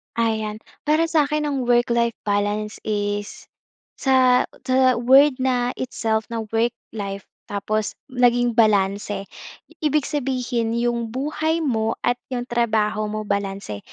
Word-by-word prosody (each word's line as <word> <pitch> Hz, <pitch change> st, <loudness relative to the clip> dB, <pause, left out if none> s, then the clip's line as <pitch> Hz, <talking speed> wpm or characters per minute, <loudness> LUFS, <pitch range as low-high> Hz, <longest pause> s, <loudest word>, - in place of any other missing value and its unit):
Ayan, 220 Hz, -2 st, -1 dB, 0.3 s
para 310 Hz, +2 st, +4 dB
sa'kin 300 Hz, -2 st, +2 dB
ang 275 Hz, -4 st, -2 dB
work-life 235 Hz, -1 st, +2 dB
balance 205 Hz, +1 st, -1 dB
is 205 Hz, -1 st, -2 dB, 0.5 s
sa 255 Hz, -2 st, +4 dB, 0.2 s
sa- 260 Hz, 0 st, +4 dB
word 265 Hz, +4 st, +5 dB
na 250 Hz, -1 st, +1 dB
itself 225 Hz, -3 st, -1 dB
na 225 Hz, -1 st, -3 dB
work-life 225 Hz, -4 st, -3 dB, 0.2 s
tapos 210 Hz, +1 st, -2 dB, 0.2 s
naging 245 Hz, -1 st, +3 dB
balanse, 205 Hz, -2 st, +2 dB, 0.6 s
ibig 300 Hz, -1 st, +2 dB
sabihin 250 Hz, -5 st, -1 dB
'yong 235 Hz, -1 st, -1 dB
buhay 310 Hz, +4 st, -1 dB
mo 225 Hz, -5 st, 0 dB
at 245 Hz, 0 st, +1 dB
'yong 250 Hz, -2 st, -2 dB
trabaho 215 Hz, -3 st, 0 dB
mo 215 Hz, 0 st, -3 dB
balanse. 195 Hz, -, -3 dB
235 Hz, 115 wpm, -22 LUFS, 215-255 Hz, 0.6 s, word